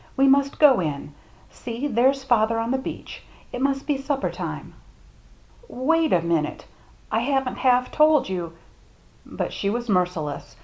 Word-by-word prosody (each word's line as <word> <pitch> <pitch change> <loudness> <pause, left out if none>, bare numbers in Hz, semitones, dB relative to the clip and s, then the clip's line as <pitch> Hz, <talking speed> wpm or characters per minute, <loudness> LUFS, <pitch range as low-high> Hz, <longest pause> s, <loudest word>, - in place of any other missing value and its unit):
We 270 +1 +4
must 275 +1 +3
go 280 -7 +6
in. 150 -3 -4 0.4
See, 240 +2 -6
there's 265 +1 +2
father 230 -3 +2
on 230 +1 -1
the 265 - 0
beach. 265 - -8 0.3
It 245 - -4
must 275 0 0
be 290 -3 -1
supper 275 0 -2
time." - - -6 0.6
" 485 - -28
Wait 320 +5 +1
a 170 - +3
minute 165 -3 -1 0.2
— - - -30
I 220 - +2
haven't 265 +1 -1
half 250 -1 +2
told 305 -3 +4
you 175 -3 -4 0.3
— - - -32
" - - -32
But - - -2
she 200 - -2
was 240 +2 -3
merciless. 180 -6 -1
250 Hz, 175 wpm, -23 LUFS, 200-275 Hz, 0.6 s, go